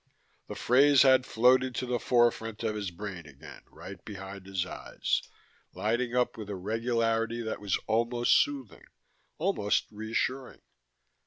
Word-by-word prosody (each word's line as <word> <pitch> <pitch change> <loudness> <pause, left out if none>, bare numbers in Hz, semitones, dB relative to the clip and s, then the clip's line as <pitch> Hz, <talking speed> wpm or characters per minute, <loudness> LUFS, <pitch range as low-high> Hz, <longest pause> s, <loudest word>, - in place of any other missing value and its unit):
The - - -7
phrase 140 +3 +5
had 130 -1 +5
floated 125 +2 +3
to 125 - -2
the 125 -1 -1
forefront 115 -3 +1
of 110 -1 0
his 105 -2 -3
brain 90 -2 -8
again, 70 -2 -13
right 95 -2 -11
behind 95 -2 -9
his 95 -2 -2
eyes, - - -2 0.5
lighting 120 +3 -1
up 125 +1 +1
with 105 -2 -7
a 100 - -3
regularity 115 +3 -1
that 110 - -4
was 100 -2 0
almost 120 +2 +2
soothing, 135 -6 -1 0.5
almost 155 - 0
reassuring. 115 +5 -3
115 Hz, 140 wpm, -29 LUFS, 105-125 Hz, 0.5 s, phrase